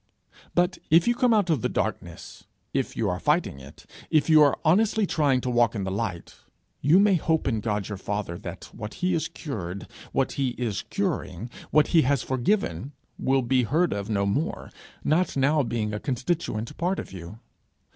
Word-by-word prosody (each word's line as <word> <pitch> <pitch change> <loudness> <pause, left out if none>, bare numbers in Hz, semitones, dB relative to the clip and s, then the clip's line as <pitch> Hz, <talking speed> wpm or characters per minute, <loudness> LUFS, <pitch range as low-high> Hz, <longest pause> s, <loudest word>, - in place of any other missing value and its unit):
But 180 +2 +2
if 165 +5 +5
you 240 - +4
have 245 - -14
come 250 -1 +5
out 205 -6 +3
of 145 -7 +1
the - - 0
darkness, - - -4 0.3
if 135 -1 -2
you 115 - +1
are 90 -1 -1
fighting 150 - +1
it, 70 +1 -14 0.2
if 155 +1 +3
you 155 -1 +8
are 145 -2 +5
honestly 210 +6 +3
trying 145 -7 +2
to 125 - -2
walk 120 -2 +3
in 100 - -2
the 95 - -3
light, 95 -4 -4 0.4
you 150 +6 +5
may 205 0 +5
hope 160 -2 +1
in 115 -4 +1
God 105 -2 -2
your 105 -3 -6
father 100 -4 -3
that - - -8
what 105 -1 -7
he 180 0 0
has 165 - 0
cured, 100 - -6 0.3
what - - +1
he 130 -3 -1
is 115 -5 -2
curing, 125 - -3 0.2
what 150 +1 +4
he 165 - +5
has 140 -2 +1
forgiven, 130 - -1 0.3
will 135 0 +2
be 130 +1 +2
heard 155 +9 +1
of 100 +1 -4
no 100 -2 +1
more, 140 +11 -2 0.3
not 160 +1 +1
now 145 +3 +3
being 110 -4 -2
a 105 - -2
constituent 130 -4 -2
part 180 +3 0
of - - -7
you. 90 +3 -9
130 Hz, 195 wpm, -26 LUFS, 105-165 Hz, 0.4 s, you